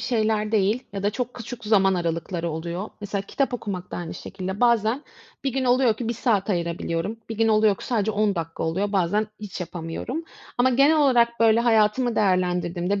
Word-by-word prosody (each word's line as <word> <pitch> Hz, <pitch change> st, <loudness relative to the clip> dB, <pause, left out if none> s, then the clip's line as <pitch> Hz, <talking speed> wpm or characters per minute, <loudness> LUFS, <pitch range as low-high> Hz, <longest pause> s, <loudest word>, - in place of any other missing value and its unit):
şeyler 215 Hz, -3 st, 0 dB
değil 215 Hz, +4 st, +2 dB
ya 195 Hz, -1 st, -4 dB
da 205 Hz, -, +2 dB
çok 250 Hz, +3 st, -4 dB
küçük 240 Hz, 0 st, -8 dB
zaman 195 Hz, -3 st, +4 dB
aralıkları 170 Hz, 0 st, -2 dB
oluyor. 170 Hz, +5 st, -4 dB
Mesela 200 Hz, -1 st, -3 dB
kitap 265 Hz, +5 st, -1 dB
okumak 190 Hz, -6 st, -5 dB
da -, -, -5 dB
aynı 175 Hz, -2 st, -5 dB
şekilde. 190 Hz, +1 st, -6 dB
Bazen 235 Hz, +2 st, +3 dB, 0.4 s
bir 270 Hz, -, 0 dB
gün 265 Hz, 0 st, -1 dB
oluyor 245 Hz, -2 st, +4 dB
ki 235 Hz, -, -4 dB
1 -, -, +1 dB
saat 215 Hz, -3 st, +1 dB
ayırabiliyorum, 170 Hz, +3 st, -2 dB
bir 225 Hz, -, -5 dB
gün 225 Hz, -, +3 dB
oluyor 215 Hz, -2 st, +4 dB
ki -, -, -10 dB
sadece 220 Hz, -4 st, 0 dB
10 210 Hz, -1 st, +1 dB
dakika 165 Hz, -2 st, -4 dB
oluyor, 190 Hz, +6 st, -1 dB
bazen 200 Hz, +3 st, +1 dB
hiç 205 Hz, -3 st, -7 dB
yapamıyorum. 175 Hz, -, -5 dB, 0.3 s
Ama 255 Hz, +1 st, +4 dB
genel 275 Hz, +5 st, +4 dB
olarak, 240 Hz, -5 st, +3 dB
böyle, 225 Hz, 0 st, +5 dB
hayatımı 230 Hz, +1 st, +2 dB
değerlendirdiğimde 180 Hz, -1 st, +1 dB
210 Hz, 185 wpm, -24 LUFS, 185-235 Hz, 0.4 s, böyle